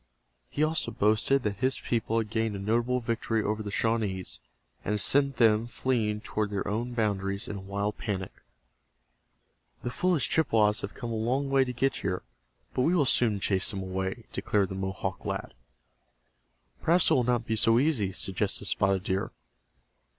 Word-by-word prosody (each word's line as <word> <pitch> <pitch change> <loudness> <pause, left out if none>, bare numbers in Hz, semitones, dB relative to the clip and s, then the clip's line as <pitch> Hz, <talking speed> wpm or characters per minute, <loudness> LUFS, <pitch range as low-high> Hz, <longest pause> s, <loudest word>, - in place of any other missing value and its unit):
He 150 - -1
also 160 +1 0
boasted 110 +6 +2
that 105 -2 -2
his 130 +4 0
people 115 -1 -1
had 110 -2 -1
gained 110 -2 0
a - - -5
notable 120 +5 0
victory 115 -1 -1
over 105 +1 -1
the 105 - -5
Shawnees, 105 -4 -1 0.4
and 105 - -1
had 105 - 0
sent 140 +6 +3
them, 110 -1 +4
fleeing 115 -4 -1
toward 105 -1 -2
their 100 -1 -3
own 115 +4 -2
boundaries 100 -2 -1
in 105 - -5
a - - -7
wild 100 +2 -3
panic. 95 -4 -3 1.5
"The 120 - -3
foolish 175 0 +1
Chippewas 110 -9 +2
have 100 - -6
come 120 - -5
a - - -2
long 130 +5 0
distance 135 -1 +3
to 125 - -3
get 135 +2 0
here, 90 -2 -3 0.5
but - - 0
we 165 +8 +3
will 150 -5 +3
soon 115 -5 +3
chase 95 -1 +1
them 95 -1 -2
away," 95 +4 -4
declared 100 -3 0
the - - -5
Mohawk 95 0 -4
lad. - - -4 1.3
"Perhaps 170 +2 +5
it - - +6
will 125 - +3
not 120 -1 0
be 110 - -1
so 115 +1 +4
easy," 125 -8 +2
suggested 95 0 -1
Spotted 95 -1 +1
Deer. 95 +1 -1
110 Hz, 175 wpm, -28 LUFS, 100-125 Hz, 1.5 s, it